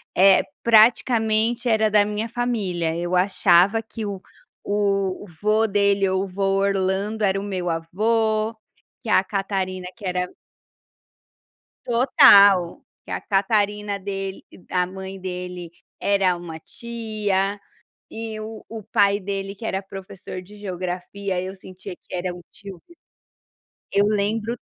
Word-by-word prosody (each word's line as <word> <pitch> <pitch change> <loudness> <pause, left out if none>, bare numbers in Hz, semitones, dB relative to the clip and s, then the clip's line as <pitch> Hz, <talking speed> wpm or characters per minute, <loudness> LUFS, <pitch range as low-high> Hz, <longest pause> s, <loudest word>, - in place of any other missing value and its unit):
eh, 195 +1 +6 0.2
praticamente 230 +1 +3
era 220 -1 +3
da 205 0 +5
minha 210 +2 -3
família. 200 -9 -1
Eu 175 +1 -2
achava 190 +2 +4
que 220 0 -7
o 195 -2 -5 0.4
o 200 -2 0 0.2
vô 215 +1 +3
dele 200 -1 +2
ou 190 +1 0
o - - -8
vô 195 +1 -4 0.2
Orlando 200 +2 0
era 195 0 +2
o 195 - -5
meu 185 -3 -3
avô, 215 +6 0 0.5
que 230 - -7
a 190 - +4
Catarina 190 -2 -3
que 205 - -10
era 180 0 -1 1.6
Total. 200 -7 +6 0.2
Que - - -13
a - - -2
Catarina 205 0 0
dele 195 0 -5 0.3
a 180 -1 +1
mãe 190 +1 -8
dele, 180 -2 -6 0.3
era 195 -3 +2
uma 170 -2 -8
tia. 210 -2 -3 0.5
E 220 -1 -6
o 220 0 -8
o 225 -1 -7
pai 200 -1 +2
dele 195 0 -4
que 220 +3 -9
era 190 -1 -1
professor 190 -1 -9
de 205 +3 -15
Geografia 185 0 -4
eu 190 +1 -6
sentia 185 -1 -10
que - - -12
era 180 0 -2
um 175 - -11
tio 195 -4 -11
meu. 340 - -19 0.9
Eu 200 +1 +3
lembro 215 +2 0
200 Hz, 135 wpm, -23 LUFS, 185-215 Hz, 1.6 s, eh